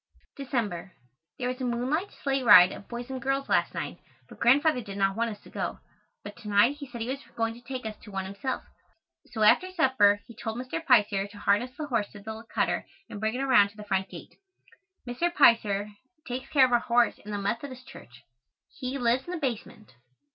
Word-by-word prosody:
December. 225 Hz, -10 st, -3 dB, 0.4 s
There 250 Hz, -, -2 dB
was 255 Hz, +1 st, -4 dB
a -, -, -2 dB
moonlight 255 Hz, +9 st, -1 dB, 0.2 s
sleigh 275 Hz, -1 st, +1 dB
ride 205 Hz, -7 st, +8 dB
of 200 Hz, -, -10 dB
boys 240 Hz, +2 st, -7 dB
and 260 Hz, -1 st, -5 dB
girls 270 Hz, +1 st, -1 dB
last -, -, +1 dB
night, -, -, -5 dB, 0.3 s
but -, -, -15 dB
Grandfather 275 Hz, +3 st, +4 dB
did 200 Hz, -3 st, -8 dB
not 195 Hz, -1 st, +1 dB
want 230 Hz, +1 st, 0 dB
us 210 Hz, -2 st, -8 dB
to -, -, -15 dB
go, -, -, -3 dB, 0.5 s
but 205 Hz, 0 st, -9 dB
to 230 Hz, -3 st, -11 dB
night 210 Hz, +7 st, +4 dB
he 285 Hz, -2 st, -8 dB
said 240 Hz, -2 st, -8 dB
he 225 Hz, -, -3 dB
was 275 Hz, +1 st, -3 dB
going 225 Hz, 0 st, -1 dB
to 235 Hz, -, -14 dB
take 250 Hz, -1 st, -6 dB
us 215 Hz, -1 st, -4 dB
to 210 Hz, -, -13 dB
one 195 Hz, -1 st, -4 dB
himself. 200 Hz, +7 st, -4 dB, 0.6 s
So 220 Hz, -3 st, -2 dB
after 350 Hz, +12 st, +5 dB
supper 260 Hz, -, +3 dB
he 235 Hz, -, -13 dB
told 225 Hz, 0 st, -5 dB
Mr. 255 Hz, +6 st, -4 dB
Piser 210 Hz, -8 st, +3 dB
to 205 Hz, +1 st, -14 dB
harness 210 Hz, +5 st, 0 dB
the 305 Hz, -, -4 dB
horse 230 Hz, -7 st, -1 dB
to 210 Hz, -, -10 dB
the 220 Hz, +2 st, -8 dB
cutter -, -, 0 dB, 0.2 s
and 205 Hz, -, -6 dB
bring 220 Hz, +2 st, -1 dB
it 265 Hz, -, -2 dB
around 245 Hz, -7 st, +5 dB
to 205 Hz, -, -21 dB
the 210 Hz, -, -8 dB
front 190 Hz, -2 st, -1 dB
gate. -, -, -11 dB, 0.7 s
Mr. 290 Hz, +9 st, -1 dB
Piser 210 Hz, -, +4 dB, 0.4 s
takes 255 Hz, +1 st, -5 dB
care 275 Hz, -3 st, +6 dB
of 255 Hz, -, -2 dB
our 240 Hz, -, +4 dB
horse 235 Hz, 0 st, +2 dB
and 210 Hz, -, -8 dB
the 205 Hz, -, -2 dB
Methodist 245 Hz, +6 st, -4 dB
Church. 120 Hz, -, -14 dB, 0.6 s
He 260 Hz, 0 st, -3 dB
lives 245 Hz, +1 st, +1 dB
in -, -, -5 dB
the -, -, -2 dB
basement. 235 Hz, -, -5 dB
235 Hz, 215 wpm, -27 LUFS, 205-260 Hz, 0.7 s, ride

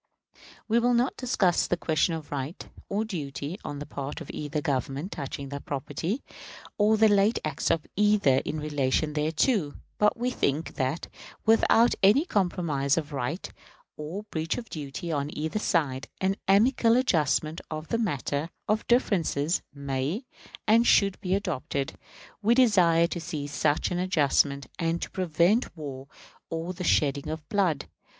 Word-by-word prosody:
We 230 Hz, +1 st, +3 dB
will 245 Hz, +1 st, +3 dB
not 245 Hz, +3 st, +1 dB
discuss 200 Hz, -8 st, +1 dB
the 175 Hz, -, 0 dB
question 165 Hz, +1 st, +1 dB
of 155 Hz, -2 st, -8 dB
right 140 Hz, +3 st, -5 dB, 0.2 s
or 210 Hz, +3 st, 0 dB
duty 155 Hz, -2 st, -5 dB
on 145 Hz, -, -5 dB
the 145 Hz, -, -6 dB
part 145 Hz, +1 st, -5 dB
of 160 Hz, -, -8 dB
either 150 Hz, 0 st, -3 dB
Government 140 Hz, -, -2 dB
touching 140 Hz, -1 st, -5 dB
that 140 Hz, 0 st, -7 dB
property, 150 Hz, -, -3 dB, 0.6 s
or 215 Hz, +1 st, +4 dB
the 220 Hz, +1 st, +6 dB
late 205 Hz, +2 st, +3 dB
acts 150 Hz, -2 st, -1 dB
of 160 Hz, -, +1 dB
either 205 Hz, -10 st, +4 dB
in 150 Hz, +3 st, -2 dB
relation 150 Hz, 0 st, 0 dB
thereto; 155 Hz, -, +1 dB, 0.2 s
but 210 Hz, +3 st, +3 dB
we 245 Hz, +2 st, -1 dB
think 150 Hz, -, -1 dB
that, 135 Hz, +4 st, -2 dB, 0.4 s
without 225 Hz, +1 st, +5 dB
any 215 Hz, -, +5 dB
compromise 170 Hz, -, 0 dB
of 155 Hz, -2 st, -3 dB
right 140 Hz, +7 st, -3 dB, 0.5 s
or 160 Hz, +7 st, -6 dB
breach 160 Hz, 0 st, -2 dB
of 230 Hz, -2 st, -7 dB
duty 150 Hz, +2 st, -5 dB
on 145 Hz, -1 st, -1 dB
either 160 Hz, +7 st, -2 dB
side, 140 Hz, -9 st, 0 dB
an 190 Hz, +1 st, +1 dB
amicable 230 Hz, +4 st, +4 dB
adjustment 155 Hz, -, +1 dB
of 155 Hz, 0 st, -6 dB
the 230 Hz, -, 0 dB
matter 145 Hz, -, -1 dB, 0.2 s
of 215 Hz, 0 st, 0 dB
differences 175 Hz, -, +1 dB
may 140 Hz, -, -3 dB, 0.4 s
and 230 Hz, +2 st, +4 dB
should 195 Hz, -2 st, +4 dB
be 185 Hz, -1 st, +1 dB
adopted. 140 Hz, -7 st, -2 dB, 0.5 s
We 225 Hz, +3 st, +4 dB
desire 180 Hz, -10 st, +5 dB
to 170 Hz, 0 st, -4 dB
see 150 Hz, -3 st, -4 dB
such 145 Hz, +4 st, 0 dB
an 175 Hz, -, -1 dB
adjustment, 145 Hz, -6 st, +2 dB
and 165 Hz, 0 st, 0 dB
to -, -, -5 dB
prevent 180 Hz, +4 st, +1 dB
war 135 Hz, -3 st, -7 dB, 0.4 s
or 165 Hz, +2 st, -3 dB
the 180 Hz, 0 st, -6 dB
shedding 145 Hz, -3 st, +2 dB
of 155 Hz, -1 st, -5 dB
blood. 180 Hz, -8 st, +1 dB
165 Hz, 155 wpm, -27 LUFS, 145-205 Hz, 0.6 s, the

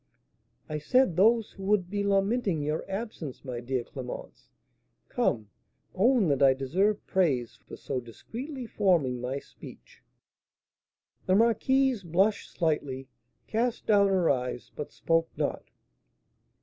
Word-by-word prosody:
"I 155 Hz, 0 st, -3 dB
said 190 Hz, -, +3 dB
those 220 Hz, +4 st, +4 dB
who 195 Hz, -, -11 dB
would 200 Hz, -3 st, +2 dB
be 205 Hz, -1 st, -1 dB
lamenting 200 Hz, -3 st, +1 dB
your 150 Hz, +2 st, -1 dB
absence, 195 Hz, -, -6 dB
my 125 Hz, -2 st, -4 dB
dear 125 Hz, 0 st, -2 dB
Clémence, 125 Hz, 0 st, -8 dB, 0.6 s
come, 105 Hz, -3 st, 0 dB, 0.4 s
own 230 Hz, 0 st, +3 dB
that 140 Hz, -1 st, +1 dB
I 135 Hz, -1 st, +6 dB
deserve 190 Hz, +11 st, 0 dB
praise 140 Hz, -, 0 dB
for -, -, -8 dB
so 130 Hz, -, -3 dB
discreetly 245 Hz, -, -7 dB
forming 170 Hz, -, +1 dB
my 130 Hz, +2 st, -2 dB
speech." -, -, -13 dB, 1.3 s
The 185 Hz, -, +4 dB
marquise 240 Hz, +3 st, +3 dB
blushed 190 Hz, +5 st, +1 dB
slightly, 145 Hz, -5 st, -2 dB, 0.4 s
cast 235 Hz, +2 st, -1 dB
down 205 Hz, -2 st, +5 dB
her 190 Hz, -3 st, +2 dB
eyes, 125 Hz, -2 st, -1 dB
but 150 Hz, -, -6 dB
spoke 165 Hz, 0 st, +1 dB
not. -, -, -2 dB
180 Hz, 125 wpm, -28 LUFS, 135-215 Hz, 1.3 s, I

